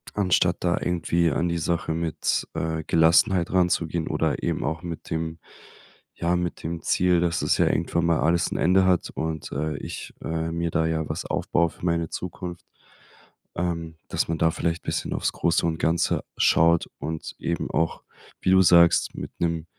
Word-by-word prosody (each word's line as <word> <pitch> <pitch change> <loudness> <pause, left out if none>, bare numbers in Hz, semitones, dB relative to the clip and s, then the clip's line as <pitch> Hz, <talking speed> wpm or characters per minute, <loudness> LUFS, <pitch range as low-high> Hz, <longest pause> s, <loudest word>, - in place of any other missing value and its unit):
anstatt 90 -3 +2
da 90 0 +1
irgendwie 85 -1 +1
an 85 +5 0
die 85 0 -1
Sache 85 0 -1
mit, 80 -2 -1
äh, 80 0 -2
Gelassenheit 85 +2 +3
ranzugehen 85 -2 +1
oder - - -1
eben - - -1
auch 80 +3 -2
mit 85 -2 -7
dem 80 0 -3 0.8
ja, 85 +1 0
mit 90 -1 -3
dem 85 +1 -4
Ziel, 90 -1 +2
dass 85 -2 0
das - - +2
ja - - +4
irgendwann 85 +1 0
mal 85 -2 +2
alles 85 +1 +2
'n - - -3
Ende 95 +1 +4
hat 90 -2 +2
und, 80 -1 -4
äh, 75 +2 -2
ich, - - -7
äh, 80 0 -2
mir 85 0 -1
da 80 -1 +1
ja 80 -1 -2
was - - -4
aufbaue 85 -1 0
für - - -18
meine 85 -1 0
Zukunft. 90 -1 -6 0.9
Ähm, 85 -2 -3
dass - - 0
man 80 - -1
da 80 - +4
vielleicht 85 +1 -2
bisschen - - -2
aufs - - -1
Große 85 -1 +1
und 80 -1 0
Ganze 85 +1 +1
schaut 85 +1 +4
und 80 +2 -5
eben 85 0 -2
auch, 80 0 0 0.4
wie - - +1
du 95 0 +6
sagst, 85 -1 +5
mit - - -6
'nem 85 -2 -1
85 Hz, 180 wpm, -25 LUFS, 80-85 Hz, 0.9 s, du